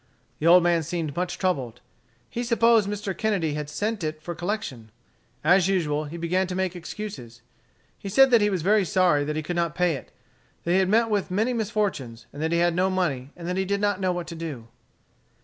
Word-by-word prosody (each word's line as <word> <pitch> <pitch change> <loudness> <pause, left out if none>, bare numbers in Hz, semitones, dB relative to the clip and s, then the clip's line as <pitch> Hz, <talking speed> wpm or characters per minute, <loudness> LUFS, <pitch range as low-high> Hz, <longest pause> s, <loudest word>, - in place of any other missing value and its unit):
The 160 - 0
old 175 +1 +7
man 170 -1 +3
seemed 160 -2 -4
much 180 0 -2
troubled. 135 - -1 0.5
He 240 - -4
supposed 230 -3 +3
Mr. 205 -2 -3
Kennedy 185 -6 0
had 150 -1 -4
sent 210 +5 -2
it 155 0 -3
for 175 +3 -6
collection. 175 - -4 0.5
As 180 +3 +4
usual, 155 -6 0
he 155 +3 -7
began 180 +3 0
to 180 - -4
make 190 -1 -1
excuses. 165 - -8 0.6
He 200 - -6
said 270 +6 +5
that 235 -2 +6
he 205 - +3
was 185 -5 -2
very 205 +2 +4
sorry 175 -4 +2
that 150 +1 -3
he 155 - -2
could 175 +3 -4
not 170 -2 -1
pay 180 -2 +2
it, 135 - -8 0.5
that 170 - -1
he 185 - +4
had 190 -1 +2
met 225 +2 +3
with 205 -2 0
many 220 +7 0
misfortunes, 205 - -2
that 155 +3 -3
he 170 - +2
had 175 0 +3
no 185 +2 +2
money, 150 -9 -1
and 170 -1 -7
that 180 +1 -2
he 190 - +1
did 200 +1 0
not 205 -1 0
know 185 -1 +1
what 175 -1 -3
to 170 - -7
do. 145 -9 -7
180 Hz, 220 wpm, -25 LUFS, 155-200 Hz, 0.6 s, old